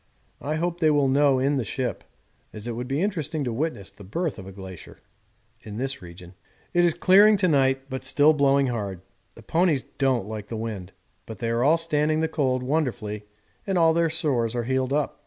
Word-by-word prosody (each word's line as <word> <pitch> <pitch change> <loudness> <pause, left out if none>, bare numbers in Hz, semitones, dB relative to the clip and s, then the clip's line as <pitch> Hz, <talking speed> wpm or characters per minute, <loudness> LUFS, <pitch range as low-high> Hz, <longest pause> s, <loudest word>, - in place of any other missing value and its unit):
I 150 +2 -2
hope 170 +2 -2
they 160 -2 +4
will 145 -2 +3
know 140 0 +3
in 140 +2 +1
the 130 - 0
ship, 120 0 -3 0.5
as 105 0 -8
it - - -2
would 120 +2 -5
be 140 +6 -1
interesting 160 -6 -2
to 120 -3 -2
witness 125 -7 -3
the 100 - -14
birth 160 - -3
of 95 - -9
a - - -8
glacier 95 -2 -11 0.6
in 105 -1 -8
this 135 0 -3
region. 90 0 -12 0.4
It 175 - +4
is 170 -2 +3
clearing 205 +3 +6
to 190 -2 +2
night, 135 -3 +2
but 130 -1 -5
still 145 +3 +4
blowing 140 -1 +3
hard. 100 -7 -3 0.3
The - - -14
ponies 165 -5 +1 0.2
don't 130 -7 +1
like 105 -2 -6
the 115 - -5
wind, 105 -5 -5 0.4
but 110 - -8
they 115 -1 -2
are 115 +1 +1
all 155 +5 +5
standing 155 -1 +1
the 160 - +1
cold 130 -5 0
wonderfully 125 -8 -2 0.4
and 190 -2 0
all 165 -1 +5
their 165 0 +2
sores 130 -8 0
are 120 - -1
healed 130 +1 -1
up. 145 0 -1
135 Hz, 210 wpm, -25 LUFS, 115-155 Hz, 0.6 s, clearing